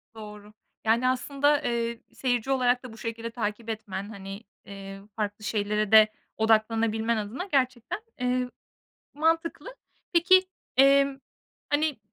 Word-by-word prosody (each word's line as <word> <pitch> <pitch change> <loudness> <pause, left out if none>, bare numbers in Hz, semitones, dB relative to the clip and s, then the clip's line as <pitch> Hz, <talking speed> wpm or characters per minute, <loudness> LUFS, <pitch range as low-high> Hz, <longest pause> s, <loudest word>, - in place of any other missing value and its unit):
Doğru, 210 -1 -10 0.3
Yani, 230 +3 +3
aslında, 280 +3 +1
eee, 235 -3 -2
seyirci 245 0 -1
olarak 250 -1 +2
da 250 -3 -9
bu - - -13
şekilde 230 0 -5
takip 225 0 -4
etmen, 205 -3 -5
hani, 195 0 -8 0.2
eee, 195 0 -9
farklı 210 -1 -3
şeylere 210 0 -1
de 215 -1 +9 0.3
odaklanabilmen 225 +1 +2
adına 215 - -4
gerçekten, 255 - 0 0.2
eee, 250 0 0 0.7
mantıklı. 330 +10 0 0.4
Peki, 370 +2 +6 0.3
emm, 275 0 +5 0.5
hani, 290 -2 +1
230 Hz, 120 wpm, -27 LUFS, 215-270 Hz, 0.7 s, de